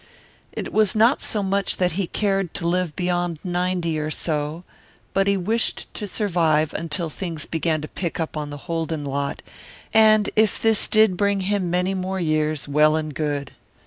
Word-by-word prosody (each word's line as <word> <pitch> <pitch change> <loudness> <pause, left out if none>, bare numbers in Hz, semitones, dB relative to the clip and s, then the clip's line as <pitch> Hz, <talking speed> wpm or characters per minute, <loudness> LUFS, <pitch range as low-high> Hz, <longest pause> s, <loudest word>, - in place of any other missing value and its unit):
It - - -6
was 215 -2 +3
not 230 +5 +4
so 210 -2 0
much 195 +1 0
that 180 -1 +2
he 185 +2 -2
cared 195 -4 -1
to 170 - -2
live 175 -2 0
beyond 175 -2 -1
ninety 175 -3 -1
or 155 0 -2
so, 155 +1 -2 0.5
but 195 0 +2
he 200 0 +3
wished 220 +5 -1
to 210 - -5
survive 165 -7 +1
until 165 +1 -2
things 165 -1 -5
began 160 -1 -1
to 155 - -5
pick 170 0 -4
up 160 -1 -3
on 150 -1 -3
the 145 - -6
Holden 165 -3 -2
lot, 140 0 -3 0.5
and 215 -1 +5
if 215 -2 +3
this 225 -2 +2
did 215 -4 +4
bring 200 0 +1
him 190 -2 0
many 180 +2 +1
more 190 0 -2
years, 155 -3 0
well 150 +2 +4
and 155 -1 -2
good. 145 -2 -2
175 Hz, 175 wpm, -23 LUFS, 155-195 Hz, 0.5 s, and